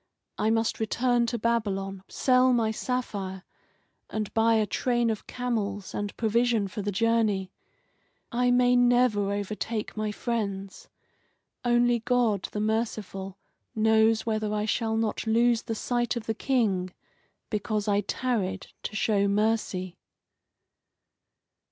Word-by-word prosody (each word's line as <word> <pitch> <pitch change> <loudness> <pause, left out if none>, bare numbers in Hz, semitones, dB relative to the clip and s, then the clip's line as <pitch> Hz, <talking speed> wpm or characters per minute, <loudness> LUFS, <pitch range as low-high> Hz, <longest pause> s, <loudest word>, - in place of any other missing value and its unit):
I 215 - +2
must 225 0 +1
return 240 +2 +1
to 235 - -1
Babylon, 200 -4 -1
sell 255 0 +3
my 225 -2 +2
sapphire, 205 -6 -3 0.7
and 215 -2 -3
buy 225 0 +4
a 215 -1 +3
train 240 +1 +1
of 215 - -6
camels, 210 -6 -3
and 205 0 -4
provision 230 -1 +2
for 205 +2 -5
the 205 +1 -2
journey. 210 -3 +1 0.8
I 245 0 +2
may 245 0 +4
never 245 -5 +3
overtake 210 +2 -3
my 215 -1 -2
friends. 200 -4 -4 0.7
Only 240 0 +3
God 235 -4 +1
the 210 - -3
merciful 210 -3 -2 0.4
knows 220 0 +3
whether 215 -2 -1
I 210 0 0
shall 220 0 0
not 225 0 -1
lose 230 +1 +3
the 225 - -4
sight 240 +2 -1
of 235 -2 -4
the 225 - -1
King 215 -7 0 0.6
because 210 0 -1
I 205 0 +3
tarried 200 -3 -2
to - - -5
show 205 -2 +2
mercy." 200 -3 0
220 Hz, 125 wpm, -27 LUFS, 205-235 Hz, 0.8 s, buy